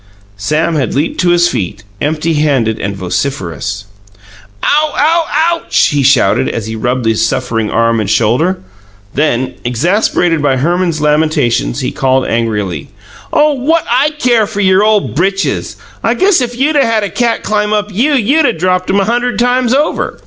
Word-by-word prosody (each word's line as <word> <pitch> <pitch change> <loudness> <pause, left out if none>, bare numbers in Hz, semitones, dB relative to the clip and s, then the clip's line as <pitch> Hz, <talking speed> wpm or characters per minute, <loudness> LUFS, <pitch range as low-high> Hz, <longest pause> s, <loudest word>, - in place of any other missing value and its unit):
Sam 155 +11 -1
had 135 -5 -2
leaped 145 +4 -1
to 180 - +2
his 175 0 +4
feet, 95 - -4 0.2
empty 155 +2 -1
handed 135 -8 0
and 100 0 -3
vociferous. 100 -1 -3 0.8
"Ow 300 0 +2
ow, 325 +3 +2 0.3
OUCH!" 335 -1 +1
he 145 -1 0
shouted, 130 -7 +3
as 115 - -4
he 110 0 -5
rubbed 125 +2 -2
his 110 0 +1
suffering 115 -3 -1
arm 115 0 +1
and 105 -3 -2
shoulder. 125 - +1 0.6
Then, 130 -4 0
exasperated 165 - 0
by 135 -2 +1
Herman's 170 +2 0
lamentations, 150 -4 +1
he 130 - -2
called 130 -1 0
angrily: 105 -9 -2 0.4
"Oh, 300 0 +3
what 305 +5 0
I 265 +5 +3
care 240 -6 +2
for 205 -1 -5
your 190 0 +3
ole 215 -1 +3
britches? 195 +5 -2 0.3
I - - +1
guess 380 -5 +3
if 240 -1 -3
you'd 295 +4 +1
'a' 280 - +4
had 225 -2 0
a 200 - -2
cat 235 -2 -1
climb 210 0 -1
up 210 -1 -1
YOU, 275 +9 +2
you'd 280 +6 +2
'a' - - +1
dropped 185 +2 -1
'em 195 - +2
a - - 0
hunderd 240 +3 -1
times 245 0 +1
over!" 295 +3 -1
165 Hz, 170 wpm, -13 LUFS, -, 0.8 s, his